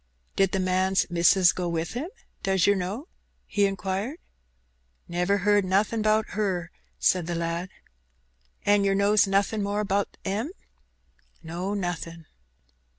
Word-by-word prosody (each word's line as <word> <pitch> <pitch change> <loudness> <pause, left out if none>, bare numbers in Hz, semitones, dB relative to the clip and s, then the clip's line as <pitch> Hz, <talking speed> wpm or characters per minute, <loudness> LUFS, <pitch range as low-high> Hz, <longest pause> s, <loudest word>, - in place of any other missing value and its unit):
"Did 195 -1 +3
the 190 - 0
man's 185 +1 +2
missis 175 +1 +5
go 180 -1 -2
wi' 165 -1 0
him, 245 - -5 0.3
does 190 -2 +2
yer 205 - +5
know?" 200 - -4 0.4
he 205 -2 +2
inquired. 195 - -3 0.9
"Never 180 +3 +1
heerd 205 +1 +3
nothing 200 +4 +1
'bout 215 0 +3
'er," 185 -5 -1 0.3
said 180 -3 +2
the 175 - -2
lad. 170 +2 -2 1.0
"An' 205 0 +4
yer 195 0 +2
knows 200 +1 +4
nothin' 200 +2 +1
more 205 +1 -1
'bout 200 +1 -1
'em?" 215 - -2 0.9
"No, 175 +5 -3
nothin'." 170 -3 -4
195 Hz, 135 wpm, -26 LUFS, 180-205 Hz, 1.0 s, missis